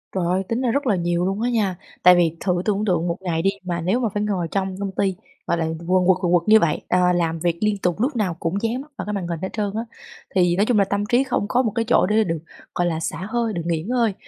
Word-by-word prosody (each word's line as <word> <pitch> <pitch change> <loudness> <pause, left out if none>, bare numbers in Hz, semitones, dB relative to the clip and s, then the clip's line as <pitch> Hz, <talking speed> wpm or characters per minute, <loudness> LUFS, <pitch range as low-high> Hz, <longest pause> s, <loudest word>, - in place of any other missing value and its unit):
Trời 185 - 0
ơi! 185 +2 +1
Tính 230 +3 -1
ra 245 - +1
rất 280 +1 -1
là 210 - +3
nhiều 175 0 0
luôn 195 +3 -1
á 245 - +1
nha, 210 -6 0 0.3
tại 180 0 +8
vì 165 -2 +2
thử 180 -2 0
tưởng 210 0 0
tượng 175 -3 +1
một 170 0 -1
ngày 170 -3 -1
đi 195 - +3
mà 175 -2 -3
nếu 190 +9 +1
mà 230 - 0
phải 205 0 -1
ngồi 185 -5 -1
trong 190 -1 -1
công 200 -1 -3
ty, 190 -2 0 0.3
gọi 170 - +1
là, 165 - 0 0.2
quần 185 -1 +3
quật, 190 -1 +5
quần 175 -2 +1
quật 175 +1 +2
như 220 - +8
vậy, 165 -6 0
ờ, 180 0 +3
làm 165 -2 0
việc 170 0 0
liên 210 -1 +1
tục 180 0 -1
lúc 260 +4 0
nào 205 -7 0
cũng 180 +4 -2
dán 235 +3 -1
mắt 300 +1 -14
vào - - -4
cái 210 - -3
màn 190 -4 -3
hình 170 -2 -3
hết 190 - -3
trơn 205 -2 -1
á, 225 - -1 0.5
thì 175 -1 +3
nói 200 - +2
chung 220 -3 +2
là 200 - +4
tâm 200 +1 -1
trí 245 +5 +3
không 250 -5 -1
có 250 - +3
một 225 - -1
cái 230 0 0
chỗ - - +4
để 215 +2 +3
được, 165 -3 -2 0.4
gọi 175 0 +1
là, 160 -1 -1
xả 165 +3 -4
hơi, 235 -2 -1
được 170 - -2
nghỉ 165 -2 0
ngơi. 230 0 +1
190 Hz, 300 wpm, -22 LUFS, 175-215 Hz, 0.5 s, tại